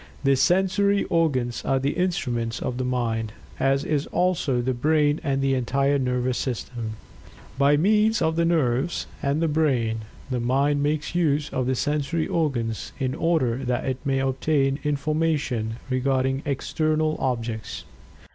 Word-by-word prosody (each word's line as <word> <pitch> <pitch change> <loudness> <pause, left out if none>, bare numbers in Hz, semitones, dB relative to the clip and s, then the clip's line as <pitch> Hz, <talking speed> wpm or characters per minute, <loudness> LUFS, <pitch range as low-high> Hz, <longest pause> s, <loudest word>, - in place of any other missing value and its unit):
The 135 0 +4
sensory 190 +6 +2
organs 130 -8 +1
are 135 - +1
the 135 +2 0
instruments 125 -11 -1
of 125 0 -3
the - - 0
Mind, 115 -3 -1 0.3
as 135 +1 +2
is 150 -2 0
also 175 -8 +1
the 130 +2 0
brain 150 +3 +2
and 135 -3 0
the 135 0 +2
entire 135 +2 +1
nervous 125 -1 0
system. 120 -3 -4 0.7
By 140 +1 +5
means 210 +6 +3
of 160 -1 +1
the 170 - +2
nerves, 155 -2 +1 0.2
and 140 +4 0
the - - +3
brain, 130 -8 +1 0.3
the 125 - 0
Mind 140 +4 +1
makes 150 +2 -1
use 150 -4 +1
of 130 -1 -1
the 130 - +1
sensory 150 +4 -1
organs 120 -9 -1
in 130 -2 -1
order 150 -9 +1
that 125 -2 -2
it 130 -1 -3
may 135 -2 0
obtain 135 +1 +1
information 150 -6 0
regarding 130 +1 0
external 155 +2 0
objects. 115 -4 -3
135 Hz, 145 wpm, -24 LUFS, 125-155 Hz, 0.7 s, By